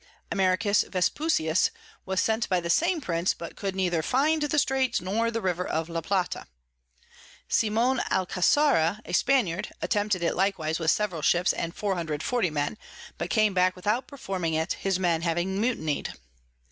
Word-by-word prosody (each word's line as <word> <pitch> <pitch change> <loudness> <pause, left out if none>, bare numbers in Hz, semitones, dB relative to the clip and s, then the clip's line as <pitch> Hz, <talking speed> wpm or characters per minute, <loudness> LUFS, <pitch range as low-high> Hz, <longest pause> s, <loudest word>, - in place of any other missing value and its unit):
Americus 195 +1 +2
Vespusius 185 - +1 0.4
was 190 0 0
sent 225 +1 0
by 185 - +2
the 170 0 -1
same 345 - +2
Prince, 170 -5 0
but 170 - -8
could 195 -2 -4
neither 175 -4 +1
find 295 - +1
the 295 +1 0
Straits 265 -3 +2
nor 210 +6 0
the 230 0 -3
River 180 -1 0
of 165 -1 -2
La 165 0 -3
Plata. 185 +1 -2 1.0
Simon 230 +4 +2
Alcasara 190 - +2
a - - -7
Spaniard 215 -8 +1
attempted 205 -4 0
it 170 - +1
likewise 175 -4 0
with 160 -1 +1
several 185 -4 0
Ships 175 +3 +3
and 170 +1 -4
440 185 +2 -1
Men, 150 +7 -2 0.4
but - - -3
came 215 -3 +3
back 185 0 +2
without 210 +7 -1
performing 185 - -3
it, 160 +2 0
his 195 -2 -1
Men 170 -3 +1
having 175 +4 -1
mutiny'd. 160 - -1
190 Hz, 155 wpm, -27 LUFS, 170-225 Hz, 1.0 s, Ships